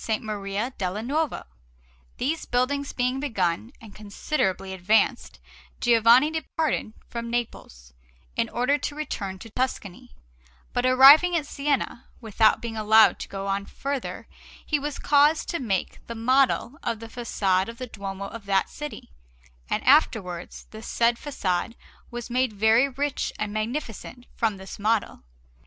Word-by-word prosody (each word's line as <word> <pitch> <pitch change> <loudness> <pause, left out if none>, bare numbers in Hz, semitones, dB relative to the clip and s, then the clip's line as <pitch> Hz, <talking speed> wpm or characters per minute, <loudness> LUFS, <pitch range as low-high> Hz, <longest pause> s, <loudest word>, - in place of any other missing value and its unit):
Maria 210 +3 -4
della 190 +3 -2
Nuova. 300 +5 -1 0.7
These 310 +5 -2
buildings 275 +3 0
being 250 +1 -1
begun 220 -6 -1
and 220 -3 -13
considerably 200 -2 -2
advanced, 210 +6 +1 0.4
Giovanni 240 +5 +5
departed 315 -7 -2
from 235 0 -5
Naples, 65 - -5 0.4
in 230 -1 0
order 250 +5 +1
to 290 - -4
return 200 -11 -4
to 225 +4 -12
Tuscany; 205 - -4 0.6
but 245 +1 +1
arriving 280 +7 +8
at 300 - -2
Siena, 280 -4 -2
without 220 -1 +2
being 230 -1 -4
allowed 220 0 +5
to - - -6
go 195 0 -6
on 200 0 -2
farther 275 -2 -5 0.4
he 300 - 0
was 290 0 -4
caused 295 +2 +3
to 340 - -2
make 200 -8 -2
the 235 - -6
model 255 +3 +2
of 225 - -2
the 230 - -8
façade 195 -6 0
of 230 - -9
the 255 - -5
Duomo 200 -4 -6
of 210 +1 -9
that 195 -1 +1
city, 295 - -8 0.6
and - - -1
afterwards 205 - +2
the 220 - -9
said 235 +1 +1
façade 230 -6 -2 0.3
was 240 -1 -6
made 255 -1 0
very 220 +6 +4
rich 280 +1 -2
and 210 -1 -3
magnificent 240 +1 -5
from 220 -4 0
this 190 +2 -10
model. 215 +1 0
230 Hz, 145 wpm, -25 LUFS, 205-270 Hz, 0.7 s, arriving